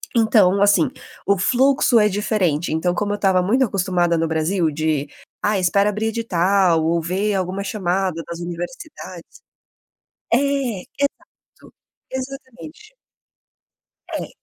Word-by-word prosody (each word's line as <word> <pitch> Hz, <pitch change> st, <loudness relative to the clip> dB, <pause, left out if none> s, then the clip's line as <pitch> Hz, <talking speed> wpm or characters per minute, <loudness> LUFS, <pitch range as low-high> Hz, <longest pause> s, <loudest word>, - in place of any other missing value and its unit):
Então 210 Hz, -4 st, +4 dB
assim, 200 Hz, -5 st, +4 dB, 0.4 s
o 200 Hz, -1 st, +3 dB
fluxo 250 Hz, +3 st, +3 dB
é 210 Hz, -, +4 dB
diferente, 185 Hz, -6 st, 0 dB
então, 175 Hz, +2 st, 0 dB
como 205 Hz, 0 st, -1 dB
eu -, -, 0 dB
estava 190 Hz, -3 st, +2 dB
muito 250 Hz, +8 st, +2 dB
acostumada 180 Hz, -5 st, 0 dB
no 165 Hz, 0 st, 0 dB
Brasil 160 Hz, +1 st, 0 dB
de: 155 Hz, -1 st, -1 dB, 0.3 s
"Ah, 205 Hz, -2 st, +1 dB
espera 200 Hz, +3 st, +2 dB
abrir 215 Hz, +2 st, -2 dB
edital 190 Hz, -6 st, +2 dB
ou 165 Hz, +1 st, +1 dB
ver 195 Hz, +5 st, -1 dB
alguma 190 Hz, +1 st, -2 dB
chamada 185 Hz, -4 st, -2 dB
nas 170 Hz, 0 st, -6 dB
universidades". 175 Hz, -, -7 dB, 1.1 s
É, 230 Hz, -, +4 dB, 0.6 s
exato. 280 Hz, 0 st, -6 dB, 0.4 s
Exatamente. 275 Hz, -, -8 dB, 1.2 s
É. -, -, -4 dB
195 Hz, 120 wpm, -20 LUFS, 175-215 Hz, 1.2 s, Então